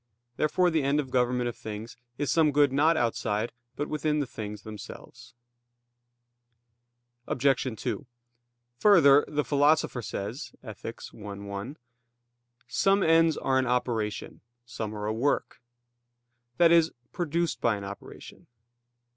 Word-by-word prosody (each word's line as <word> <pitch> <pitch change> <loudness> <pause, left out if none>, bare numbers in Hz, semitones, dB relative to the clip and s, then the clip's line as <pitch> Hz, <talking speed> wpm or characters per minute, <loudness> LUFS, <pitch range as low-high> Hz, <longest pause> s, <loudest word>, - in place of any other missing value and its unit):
Therefore 175 +6 +2
the 160 -1 +2
end 140 +2 +1
of 135 -3 -3
government 125 -1 +1
of 120 - -4
things 110 +2 -7 0.2
is 145 -1 -1
some 160 -2 +4
good 145 -1 +3
not 155 +4 +4
outside, 115 -2 -1 0.2
but 145 - -3
within 150 0 0
the 145 - 0
things 105 -3 -7
themselves. 115 +3 -11 1.9
Obj. 130 0 +1
2: 140 - -3 0.7
Further, 145 -7 +7
the 150 -1 -1
Philosopher 145 -3 +2
says 110 +6 -5
(Ethic. 115 0 -8
i, 105 -2 -8
1): 100 +7 -6 0.9
"Some 195 +10 +2
ends 165 -1 +4
are 130 0 +1
an 130 - 0
operation; 115 -4 -2 0.2
some 110 -2 -5
are 105 0 -4
a 110 - -1
work" 130 +4 -1 1.0
i.e. 170 0 +7 0.3
produced 170 0 -1
by 115 -2 +2
an 100 - -7
operation. 100 +1 -10
130 Hz, 125 wpm, -28 LUFS, 110-150 Hz, 1.9 s, Further